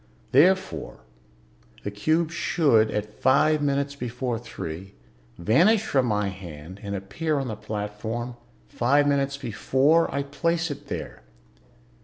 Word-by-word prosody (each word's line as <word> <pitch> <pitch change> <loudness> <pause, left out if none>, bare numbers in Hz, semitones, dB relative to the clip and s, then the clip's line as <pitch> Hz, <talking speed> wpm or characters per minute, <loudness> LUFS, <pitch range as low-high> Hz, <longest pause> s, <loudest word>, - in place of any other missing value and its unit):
Therefore, 185 +9 +2 0.8
the 100 - -3
cube 155 +11 +1
should, 150 -8 +3
at 105 0 -4
five 145 +4 +4
minutes 140 0 0
before 125 -2 -3
three, 95 -5 -7 0.4
vanish 175 - +4
from 130 -8 +2
my 105 -2 +1
hand 90 -1 -9
and 100 -1 -4
appear 145 +11 -2
on 135 -2 -2
the 110 - -3
platform, 110 +3 -4 0.3
five 140 +5 +2
minutes 140 -1 +1
before 135 +6 +2
I 140 - -1
place 165 +3 -1
it 145 - -8
there." - - -6
130 Hz, 125 wpm, -25 LUFS, 105-145 Hz, 0.8 s, five